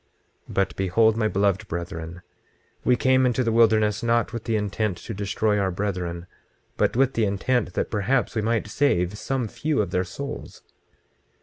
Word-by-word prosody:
26:26 - - -9
But 95 - +1
behold, 110 +4 +3
my 110 -1 +1
beloved 100 0 +1
brethren, 85 0 -6 0.6
we 125 - +4
came 130 +1 +3
into 125 0 +2
the 115 - +1
wilderness 110 -2 +3
not 115 -1 +1
with 115 -2 -5
the 115 -2 0
intent 105 -2 -1
to - - -7
destroy 105 +1 0
our 95 -1 +1
brethren, 90 -3 -3 0.5
but - - +1
with 135 +1 +3
the 115 - +1
intent 100 0 0
that - - -2
perhaps 115 +5 0
we 110 - 0
might 115 +1 0
save 105 -7 +1
some 130 +2 -2
few 150 +7 -1
of 100 -4 0
their 90 -1 +1
souls. 140 +11 -7
105 Hz, 175 wpm, -24 LUFS, 95-115 Hz, 0.6 s, we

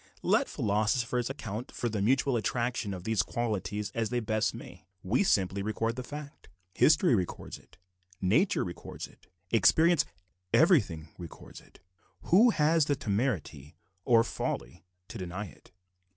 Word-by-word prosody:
Let - - +2
philosophers 115 +4 0
account 110 +3 -6
for 120 - -3
the 105 -3 -2
mutual 130 +4 +2
attraction 120 -1 -1
of 90 - -9
these 110 -1 +1
qualities 105 -1 -3
as 115 -2 -1
they 125 - 0
best 110 -1 0
may, - - -12 0.2
we 105 - +2
simply 100 - +1
record 110 +3 -2
the 130 - -4
fact. 145 +3 -9 0.2
History 155 -1 +4
records 95 -6 -3
it; - - -23 0.4
nature 130 - +2
records 90 -1 -7
it; - - -20 0.2
experience 160 +7 +4 0.5
everything 100 - +3
records 85 -2 -10
it; - - -22 0.4
who 215 +8 +5
has 160 -5 +3
the 145 - +1
temerity, 100 - -2 0.3
or 115 0 +5
folly, 60 - -4 0.2
to 115 - -8
deny 90 +3 -5
it? 85 - -16
115 Hz, 140 wpm, -29 LUFS, 100-130 Hz, 0.5 s, who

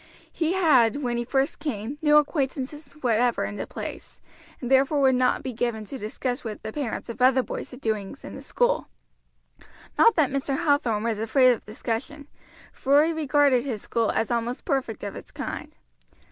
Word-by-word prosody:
He 330 +1 0
had, 290 - +4
when 240 -1 -1
he 240 - -1
first 270 +2 0
came, 275 -2 -4
no 300 -1 +5
acquaintances 290 0 -1
whatever 240 0 +2
in 205 - -5
the - - -4
place, - - -8 0.4
and 245 0 -5
therefore 270 +2 +4
would 265 -1 +5
not 250 0 +2
be 260 - -4
given 225 -2 -2
to 270 - -7
discuss 245 +4 -3
with 220 -3 -6
the 220 0 -5
parents 280 -6 -4
of 235 +1 -7
other 260 0 +5
boys - - -6
the 250 - -10
doings 220 0 -3
in - - -8
the - - -8
school. - - 0 1.1
Not 460 - +6
that 305 -6 +2
Mr. 275 0 -1
Hathorn 245 -8 +2
was 225 -2 -1
afraid 255 +3 +4
of 235 - -3
discussion, 240 +7 -4 0.5
for 285 +3 +4
he 330 - 0
regarded 290 -4 +3
his 240 -7 -4
school 230 -2 0
as 225 - 0
almost 235 +1 -2
perfect 265 - -2
of 200 -1 -5
its - - -10
kind. - - -6
255 Hz, 185 wpm, -25 LUFS, 230-285 Hz, 1.1 s, Not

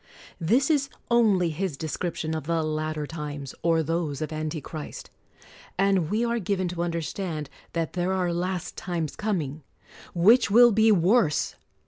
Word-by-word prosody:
This 245 - +2
is 280 -2 +1 0.2
only 205 -8 +4
his 165 -2 -3
description 160 +1 -3
of 155 -3 -3
the 165 -1 +1
latter 155 0 -2
times, 145 -3 -6
or 165 -1 +2
those 160 -3 -2
of 155 0 -4
anti 155 +1 -3
christ; 150 +1 -8 0.7
and 195 -4 +2
we 220 +4 +1
are 235 0 0
given 190 -2 -1
to 170 -1 -4
understand 170 -2 -3 0.2
that 165 -2 -2
there 180 +1 0
are 180 -2 0
last 180 0 -3
times 170 -5 -3
coming, 160 -9 -2 0.5
which 220 +8 +5
will 240 +3 +7
be 220 +1 +4
worse 185 -3 +3
170 Hz, 150 wpm, -26 LUFS, 155-195 Hz, 0.7 s, will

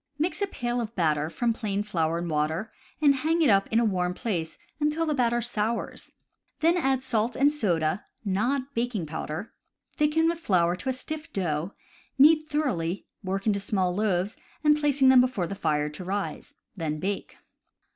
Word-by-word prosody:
Mix 335 +7 -1
a 400 - +2
pail 245 -7 -2
of 230 0 -6
batter 155 -3 +1
from 235 +6 0
plain 205 -3 -2
flour 165 -5 0
and 170 0 -3
water, 160 +7 -1 0.3
and 285 -1 +7
hang 325 +5 +1
it 270 - +5
up 195 0 +3
in 225 - +4
a 235 - +3
warm 180 -3 0
place 175 -9 -3 0.2
until 300 +2 +1
the 310 - 0
batter 240 -3 +1
sours. 230 0 -3 0.5
Then 335 +2 +4
add 270 -6 +1
salt 235 -2 0
and 285 +3 +3
soda 175 - 0 0.2
(not 255 +8 0
baking 230 -6 -1
powder), 155 +5 -5 0.4
thicken 300 +2 +2
with 335 0 0
flour 175 - +2
to 185 +9 -4
a - - +1
stiff 310 +4 -6
dough, 170 -1 -2 0.4
knead 310 +3 +6
thoroughly, 200 - -1 0.2
work 195 +1 -2
into 205 -2 +2
small 190 -3 0
loaves, 200 0 0 0.3
and 300 -1 +6
place 290 -2 0
them 260 -1 +8
before 250 -8 0
the 170 - -5
fire 150 -5 0
to 150 +5 -8
rise. 195 +2 -4 0.2
Then 160 -5 -3
bake. 195 +4 -4
215 Hz, 175 wpm, -27 LUFS, 180-270 Hz, 0.5 s, them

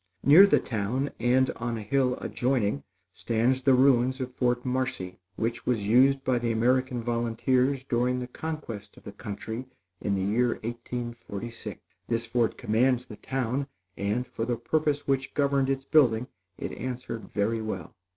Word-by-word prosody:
Near 165 +9 +9
the - - +4
town, 120 +5 -2
and 125 +3 +3
on 115 0 -2
a 110 - -5
hill 125 +3 +1
adjoining, 120 - 0 0.3
stands 120 +3 +1
the 130 0 +5
ruins 130 0 +4
of 130 -1 -4
Fort 125 0 0
Marcy, 125 -8 -2 0.2
which 115 +3 -3
was 115 -5 +1
used 135 +5 +4
by 125 -2 +1
the 120 -1 0
American 125 +2 +1
Volunteers 125 +3 +1
during 125 0 +1
the 125 - -3
conquest 125 -7 -6
of - - -15
the - - -8
country 110 +5 -6 0.3
in 100 - 0
the 95 - -1
year 120 +5 +2
1846. 120 -1 -6 0.3
This 115 0 -1
fort 115 -1 0
commands 125 +3 +2
the 105 - -10
town; 135 +1 -2 0.3
and, 105 +5 -1
for 115 - -5
the 120 0 -1
purpose 150 +4 0
which 135 -1 0
governed 140 -2 +2
its 135 0 -1
building 125 -7 +4 0.3
it - - -4
answered 125 -3 -5
very 110 +2 0
well. 95 -7 -5
125 Hz, 160 wpm, -27 LUFS, 115-130 Hz, 0.3 s, Near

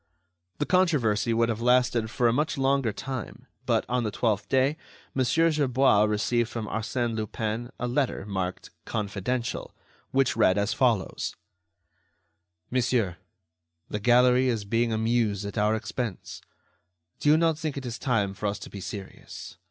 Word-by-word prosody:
The 145 - 0
controversy 140 - +2
would 115 +1 +2
have 115 0 -2
lasted 125 -2 +3
for 120 +1 +1
a 115 - +3
much 150 +4 0
longer 135 -3 +2
time, 130 +2 -6 0.2
but, - - +2
on 125 +1 0
the 110 - -1
twelfth 110 -1 -1
day, 135 +3 +3 0.4
Mon. 130 - +1
Gerbois 135 -6 +3
received 110 +2 +1
from 115 -3 -4
Arsène 115 +2 -2
Lupin 110 +2 -3
a 125 - -1
letter, 125 -5 -1
marked 95 -3 -4
"confidential," 110 +3 -3 0.3
which 135 0 +2
read 95 - +4
as 100 +1 +1
follows: 115 -7 0 1.4
"Monsieur, 120 -7 +1 0.7
the 105 - -2
gallery 125 +3 +4
is 115 -4 -1
being 115 +3 +1
amused 110 -2 +1
at 100 - -6
our 105 +1 +3
expense. 110 -2 -5 0.8
Do 145 - +2
you 155 - +6
not 165 -2 +2
think 155 -3 -3
it 135 - -5
is 120 -1 -5
time 105 -7 0
for 105 +2 -3
us 100 +1 -2
to - - -10
be 100 - -7
serious? 95 0 -8
115 Hz, 150 wpm, -27 LUFS, 105-130 Hz, 1.4 s, you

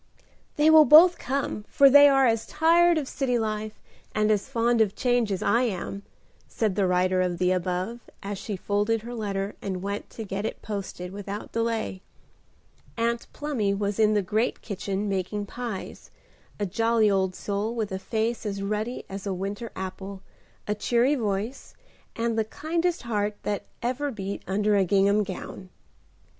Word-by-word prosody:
"They 305 +2 +5
will 315 -1 +8
both 330 +6 +8
come, 265 -5 -2
for 280 - +6
they 285 +1 +8
are 270 -1 +4
as 225 -2 +1
tired 335 +2 +4
of 290 -4 -2
city 255 -3 0
life 215 -1 -3 0.4
and 215 0 +2
as 210 +4 0
fond 235 -2 +2
of 210 -2 +1
change 245 -4 +1
as 195 +1 -2
I 235 - +3
am," 200 -4 -3 0.5
said 215 -4 -1
the 195 -1 +2
writer 185 0 +2
of 180 -1 -1
the 180 +1 +2
above, 185 +5 -2 0.2
as 200 0 -4
she 210 - -4
folded 210 +3 0
her 240 +1 -7
letter 200 -3 -3
and 190 -2 -4
went 200 +1 -4
to 225 - -7
get 200 -1 -4
it - - -5
posted 195 -3 -5
without 200 +1 -6
delay. 230 -4 -2 1.0
Aunt 235 0 -1
Plumy 235 -10 -1
was 205 +1 -2
in 215 -1 +4
the 205 - +2
great 215 +6 -1
kitchen 200 0 -3
making 195 +1 -2
pies; 230 -2 -7 0.5
a 205 - 0
jolly 225 +2 +2
old 190 -2 +1
soul, 205 +3 -3
with 220 -4 -2
a 190 - -3
face 225 +3 -2
as 200 -2 -3
ruddy 215 +4 -3
as 195 +1 -7
a 195 - -1
winter 200 +5 -5
apple, 190 +1 -6 0.4
a 210 - +1
cheery 240 +6 +2
voice, 220 0 -3 0.4
and 230 -1 -1
the - - +3
kindest 330 +7 -2
heart 210 -3 -1
that 205 -2 -2 0.2
ever 255 +4 -1
beat 200 -5 -5
under 205 +2 +1
a 200 - +4
gingham 200 +3 +3
gown. 185 -1 -7
210 Hz, 170 wpm, -26 LUFS, 195-235 Hz, 1.0 s, will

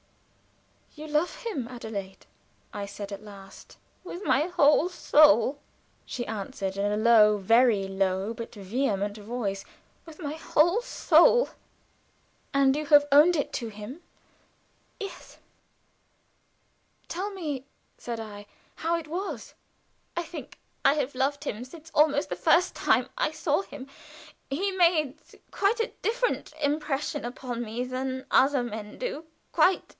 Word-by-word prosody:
"You 305 0 -8
love 305 +3 0
him, 290 - -3
Adelaide?" 220 -6 -7 0.5
I 205 -1 -4
said, 200 0 -8
at 200 - -7
last. 195 -2 -13 0.3
"With 360 +1 -7
my 275 +3 +3
whole 315 -1 +4
soul!" 285 - +4 0.5
she 240 - -4
answered, 200 -2 -4
in 200 +1 0
a 210 - 0
low, 215 -2 +6
very 220 0 +3
low, 190 +2 -1
but 230 0 -8
vehement 205 -1 -1
voice. 205 -3 -4 0.4
"With 320 -2 -13
my 295 -4 -4
whole 335 +6 +2
soul." 485 0 +4 1.0
"And 275 -1 +4
you 305 0 -3
have 290 0 +6
owned 305 +5 +7
it 290 - -2
to 230 -3 -3
him?" 215 +9 -9 1.0
"Yes." 390 -4 -8 1.7
"Tell 380 +4 -3
me," 305 -9 -5 0.3
said 235 -1 -5
I, 205 -2 -8 0.3
"how 330 +1 0
it 325 -2 -7
was." 360 +6 -5 0.6
"I 345 - 0
think 340 - -9 0.3
I 275 - +5
have 280 -3 -2
loved 275 +3 0
him 225 -3 -4
since 315 +5 -12
almost 295 -1 +3
the - - -2
first 360 +2 +3
time - - +2
I - - +1
saw - - 0
him 285 -7 -10 0.6
he 370 +9 -1
made 335 -7 +3 0.4
quite 410 +4 +1
a 455 - -1
different - - -1
impression 295 0 -1
upon 240 0 -5
me 235 +2 -4
than 260 +1 -4
other 270 -1 +4
men 215 -3 -7
do 480 -11 -4 0.3
quite. 370 0 +3
270 Hz, 135 wpm, -27 LUFS, 220-320 Hz, 1.7 s, owned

